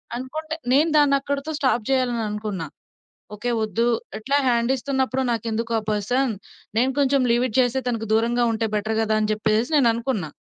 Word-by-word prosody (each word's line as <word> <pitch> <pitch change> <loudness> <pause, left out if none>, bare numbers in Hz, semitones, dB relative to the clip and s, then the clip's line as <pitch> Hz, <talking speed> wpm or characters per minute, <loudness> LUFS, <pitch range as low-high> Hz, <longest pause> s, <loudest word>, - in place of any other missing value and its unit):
అనుకుంటే 310 +6 -5 0.2
నేను 300 +5 +4
దాన్ని 290 -2 +5
అక్కడితో 280 +2 -3
స్టాప్ 255 -6 +1
జేయాలననుకున్నా 215 -8 -1 0.7
ఓకే. 240 +4 -3
వద్దు 215 +2 0 0.3
ఇట్లా 275 +6 0
హ్యాండిస్తున్నప్పుడు 260 +2 0
నాకెందుకు 230 0 -2
ఆ - - +2
పర్సన్, 235 +5 0 0.4
నేను 255 +3 +3
కొంచెం 275 -1 +3
లీవ్ 240 +2 +2
ఇట్ 220 - -8
చేస్తే 250 +1 +2
తనకు 225 -2 -2
దూరంగా 235 +2 +2
ఉంటే 225 0 -1
బెటర్ 215 +1 -1
గదా! 220 -1 +1
అని 215 0 0
చెప్పేసి 215 +2 0
నేననుకున్నా. 235 - +1
235 Hz, 150 wpm, -23 LUFS, 220-265 Hz, 0.7 s, దాన్ని